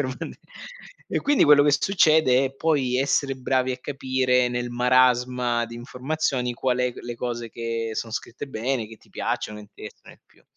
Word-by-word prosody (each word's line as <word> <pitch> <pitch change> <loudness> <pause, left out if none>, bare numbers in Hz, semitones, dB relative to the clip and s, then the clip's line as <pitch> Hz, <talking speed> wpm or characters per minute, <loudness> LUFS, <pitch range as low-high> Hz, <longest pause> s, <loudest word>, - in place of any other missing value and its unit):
per 140 - 0
uno 130 0 -4
di - - -7 0.7
E - - -1
quindi 290 0 +3
quello 145 -1 +7
che 145 - +4
succede 155 -6 +4
è 135 - -7
poi 135 -5 +1
essere 135 0 +1
bravi 130 0 0
a 125 - -6
capire 130 -2 0
nel 120 0 -3
marasma 125 -1 +2
di 115 - -9
informazioni 125 0 -2
qual 125 0 0
è 125 -1 0
g - - -23
le 120 0 -5
cose 120 -1 -4
che 115 -1 -3
son 115 +1 -4
scritte 120 +4 -6
bene, 120 -1 -2
che 110 - -12
ti - - -25
piacciono, 105 0 -3
interessano 105 0 -13
più. - - -27
125 Hz, 180 wpm, -24 LUFS, 120-135 Hz, 0.7 s, quello